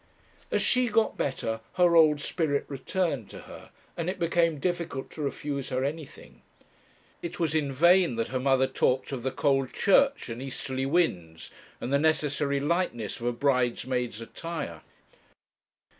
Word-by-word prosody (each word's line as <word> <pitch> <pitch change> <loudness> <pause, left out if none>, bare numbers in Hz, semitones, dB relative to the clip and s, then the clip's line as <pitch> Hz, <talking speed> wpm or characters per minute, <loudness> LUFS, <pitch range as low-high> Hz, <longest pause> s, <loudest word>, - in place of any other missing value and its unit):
As - - +1
she 250 -1 +3
got 225 0 +2
better 115 -5 -2
her 175 -2 +4
old 155 -3 +5
spirit 145 -3 -1
returned 140 - -2
to - - -10
her, - - -12 0.3
and 170 +1 -2
it 185 - -3
became 170 -2 +1
difficult 170 -3 -3
to 155 - -8
refuse 140 -1 -3
her 130 +1 -1
anything. 150 +1 -7 0.8
It 175 +1 -6
was 165 -3 0
in 150 -3 0
vain 170 +1 +4
that 115 0 -2
her 130 - -2
mother 135 0 +3
talked 130 0 0
of 130 -3 -4
the 130 - -1
cold 135 0 0
church, 275 +8 +3
and 115 +1 -6
easterly 135 0 -3
winds, 90 - -1 0.3
and 130 - -3
the 140 - +4
necessary 145 -2 +1
lightness 145 - -1
of 120 - -3
a - - +2
bridesmaid's 125 -2 0
attire. 115 - -6
140 Hz, 155 wpm, -28 LUFS, 130-170 Hz, 0.8 s, old